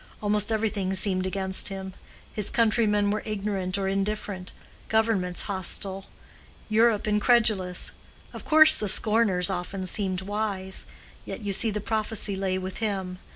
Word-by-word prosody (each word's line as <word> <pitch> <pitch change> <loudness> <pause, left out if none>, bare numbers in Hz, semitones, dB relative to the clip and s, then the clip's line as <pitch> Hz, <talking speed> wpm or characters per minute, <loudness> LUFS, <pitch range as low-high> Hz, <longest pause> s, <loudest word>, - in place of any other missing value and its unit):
Almost 210 +1 0
everything 210 -3 -1
seemed 185 -1 +1
against 190 0 0
him; 190 -1 -6 0.4
his 210 -2 -2
countrymen 215 -3 +3
were 215 - -1
ignorant 195 -3 -3
or 195 -1 -1
indifferent, 195 -1 -3 0.4
governments 220 -5 +1
hostile, 195 0 -2 0.6
Europe 220 -1 +3
incredulous. 210 -4 +2 0.4
Of - - -8
course 310 0 +7
the 210 - -1
scorners 210 -4 +2
often 185 +2 -4
seemed 185 -1 +1
wise. 200 -2 -2 0.4
Yet - - -7
you 205 -2 -2
see 225 +4 +2
the 210 0 -3
prophecy 215 -1 0
lay 190 -1 -1
with 185 0 -5
him. 190 -4 -3
200 Hz, 135 wpm, -26 LUFS, 190-215 Hz, 0.6 s, course